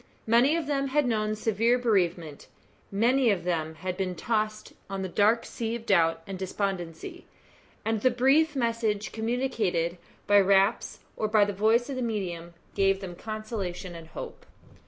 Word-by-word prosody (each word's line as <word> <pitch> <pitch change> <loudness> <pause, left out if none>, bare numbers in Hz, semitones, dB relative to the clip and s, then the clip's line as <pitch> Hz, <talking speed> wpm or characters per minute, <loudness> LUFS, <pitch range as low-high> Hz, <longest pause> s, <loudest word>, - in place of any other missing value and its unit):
Many 240 +7 +4
of 335 -2 -1
them 275 -1 0
had 290 +1 +1
known 215 -3 0
severe 225 +3 +2
bereavement 175 - 0 0.4
many 240 +5 +3
of 200 -4 +1
them 160 -3 -2
had 180 +3 -4
been 185 -2 -2
tossed 215 +3 -2 0.2
on 195 -1 -3
the - - -2
dark 215 +5 +2
sea 230 0 -3
of 235 -1 -7
doubt 165 -5 +2
and 190 -2 -7
despondency 190 -3 -4 0.6
and 220 -1 0
the 255 - +4
brief 275 +5 +3
messages 230 -4 0
communicated 220 -8 -1 0.3
by 205 0 +6
raps, 195 +2 +2
or 215 - -1
by 210 -1 +4
the 205 - -3
voice 220 +5 +2
of 275 -2 -4
the - - -2
medium, 175 -7 -4 0.2
gave 195 -1 +2
them 190 -3 -7
consolation 215 -4 -5
and 165 -1 -10
hope. - - -9
210 Hz, 160 wpm, -27 LUFS, 185-235 Hz, 0.6 s, by